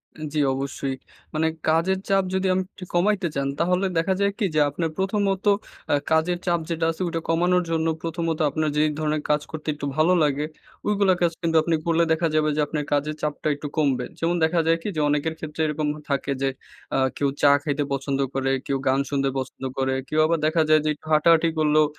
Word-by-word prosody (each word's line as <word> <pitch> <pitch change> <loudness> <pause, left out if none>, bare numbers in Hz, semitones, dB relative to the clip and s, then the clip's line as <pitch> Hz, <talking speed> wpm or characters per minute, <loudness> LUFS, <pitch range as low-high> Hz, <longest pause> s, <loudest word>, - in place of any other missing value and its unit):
এ - - -12
জি, 155 - 0
অবশ্যই। 135 0 -3 0.4
মানে 160 +1 +1 0.2
কাজের 170 +4 +2
চাপ 195 -1 +3
যদি 190 0 +1
আমি 185 - +1
একটু 185 - -10
কমাইতে 190 +1 +2
চান, 140 0 0
তাহলে 180 +3 +2
দেখা 175 +4 +2
যায় 200 0 +3
কী? 205 - +2
যে 155 - +4
আপনার 160 +3 -2
প্রথমত 195 0 0 0.5
আ - - +4 0.2
কাজের 160 +3 +2
চাপ 170 -1 +2
যেটা 165 -1 0
আছে, 165 - -8
ওইটা 165 -1 -2
কমানোর 180 +2 +3
জন্য 165 0 +1
প্রথমত 165 -1 -2
আপনার 155 +1 -1
যে 150 - +4 0.2
ধরনের 155 -1 0
কাজ 150 0 +3
করতে 155 0 -7
একটু 145 -1 -6
ভালো 160 +4 +4
লাগে, 145 0 +1 0.4
ওইগুলো 200 -2 +3
কাজ 170 -1 +3
কিন্তু 165 -1 0
আপনি 165 0 +1
করলে 170 0 +3
দেখা 165 +1 +2
যাবে 155 0 +3
যে 155 - +1
আপনার 150 -1 -2
কাজের 150 +1 0
চাপটা 150 0 -2
একটু 145 +1 -6
কমবে। 135 -5 +1
যেমন 170 +1 +1
দেখা 165 +2 +2
যায় 165 - +4
কী? - - -5
যে 155 - 0
অনেকের 150 +2 0
ক্ষেত্রে 155 0 -5
এরকম 150 0 -1 0.2
থাকে 140 0 -1
যে 135 - +2 0.5
আ - - +2 0.2
কেউ 140 -1 +1
চা 145 -1 +6
খাইতে 145 -1 -1
পছন্দ 135 0 -2
করে, 135 0 0
কেউ 135 - 0
গান 130 +1 +3
শুনতে 135 -1 +1
পছন্দ 130 0 -5
করে, 130 0 +1
কেউ 155 - 0
আবার 165 +1 +1
দেখা 160 +1 +2
যায় 155 0 +6
যে - - +2
একটু 150 - -18
হাঁটাহাঁটি 165 +2 +5
করলেও 155 0 +4
160 Hz, 210 wpm, -24 LUFS, 150-170 Hz, 0.5 s, চা